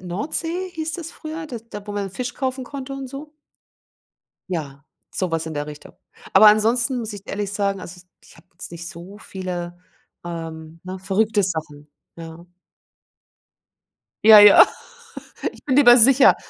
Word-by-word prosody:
Nordsee, 315 - -4
hieß 320 -1 -4
das 330 -2 -6
früher, 315 +1 -7
d 245 -5 -7
da 205 0 -9
wo 205 - -6
man 200 -2 -4
Fisch 245 +5 -5
kaufen 260 -1 -3
konnte 275 0 -8
und 270 -1 -6
so. 285 +3 -10 1.2
Ja, 140 -5 -5 0.3
so 185 -3 -2
was 165 0 -2
in 160 - -6
der 145 0 -4
Richtung. 150 0 -11 0.4
Aber 215 +3 +8
ansonsten 230 +4 +3
muss 220 -2 -5
ich 200 - -9
dir - - -9
ehrlich 200 0 -3
sagen, 200 -1 -1
also, 180 0 -10 0.2
ich - - -19
habe - - -21
jetzt - - -10
nicht 170 0 -8
so 180 +3 -11
viele, 175 -3 -6 0.5
ähm, 165 -1 -8
ne, 185 0 -7
verrückte 205 +2 0
Sachen, 155 -5 -5 0.3
ja. 165 +1 -11 1.8
Ja, 215 -1 +10
ja. 205 0 +9 0.9
Ich - - -19
bin 260 - 0
lieber 245 -4 +7
sicher. 265 +3 +6
200 Hz, 160 wpm, -21 LUFS, 175-255 Hz, 1.8 s, Ja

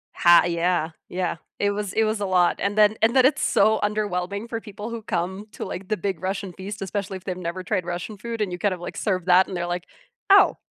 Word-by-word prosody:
Ha 175 0 +6
yeah, 170 -1 0 0.2
yeah. 180 -1 -2 0.2
It 205 0 +2
was 205 -1 -3
it 225 - +3
was 215 0 0
a 205 - -1
lot, 180 -2 +3
and 200 +2 -1
then 210 0 +5
and 225 +3 +3
then 260 -1 +6
it's 275 - +3
so 215 +2 +3
underwhelming 205 0 -2
for 230 - -3
people 210 +1 -8
who 230 -1 -5
come 190 0 -3
to, - - -6
like, 185 +1 -6
the 215 - +2
big 185 -2 -3
Russian 190 0 -3
feast, 200 +2 -7
especially 195 0 -3
if 185 - -15
they've 185 -2 -3
never 180 +1 -4
tried 180 0 -1
Russian 175 +4 -5
food 230 +1 -5
and 200 - -1
you 180 - -4
kind 205 -3 +1
of, 180 - -7
like, - - -7
serve 185 -5 -1
that 180 +1 +5
and 185 - -6
they're 175 - -2
like, 175 0 -3 0.4
"Oh," 395 +1 +6
195 Hz, 245 wpm, -24 LUFS, 180-210 Hz, 0.4 s, Ha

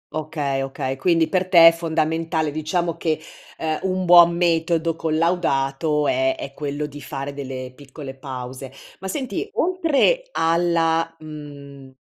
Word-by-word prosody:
Okay, 150 -3 -2
okay. 135 0 -3
Quindi 165 +3 +2
per 185 +2 -1
te 170 -2 +9
è - - +1
fondamentale 160 -1 -1
diciamo 160 +3 -2
che, 155 -2 -1 0.4
uhm, 155 -1 -2
un 185 -1 -1
buon 170 -1 +7
metodo 165 -1 +1
collaudato 155 -3 0
è 130 0 +1
è 135 - -7
quello 145 +1 -4
di 145 0 -9
fare 140 +1 -6
delle 130 -2 -6
piccole 140 0 -10
pause. 130 0 -7 0.3
Ma 190 - -6
senti, 265 - -3
oltre 370 - +2
alla 165 0 +1
mhmm, 145 -3 -11
155 Hz, 135 wpm, -22 LUFS, 140-170 Hz, 0.4 s, te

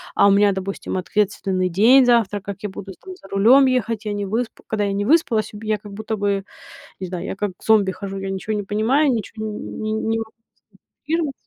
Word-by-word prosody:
а 200 - +5
у - - +5
меня, 200 +1 +5
допустим, 190 0 -4
ответственный 190 -1 0
день 235 +9 +6
завтра, 225 -4 +2
как 200 0 -6
я - - -1
буду, 195 0 -8
там, 375 -1 -9
за 195 - -16
рулем 240 +8 +5
ехать, 230 -4 0
я 210 - -2
не 205 0 -3
выспа 225 +4 -3
когда 215 -1 -1
я 200 - -1
не 200 +1 -1
выспалась, 240 -7 +2
у - - -8
меня 215 0 -1
как 205 -1 -12
будто 220 +1 -4
бы, 200 -1 0 0.6
не 190 - -4
знаю, 180 -1 -5
я - - -4
как 205 0 -2
зомби 210 -3 +4
хожу, 195 0 -6
я 195 0 -4
ничего 195 +3 -3
не 205 - -2
понимаю, 235 +8 +2
ничего 220 0 -4
не 215 0 -5
не 220 +1 -1
могу 220 0 -6 0.5
сфокусироваться. 315 -2 -3
210 Hz, 215 wpm, -21 LUFS, 195-225 Hz, 0.6 s, день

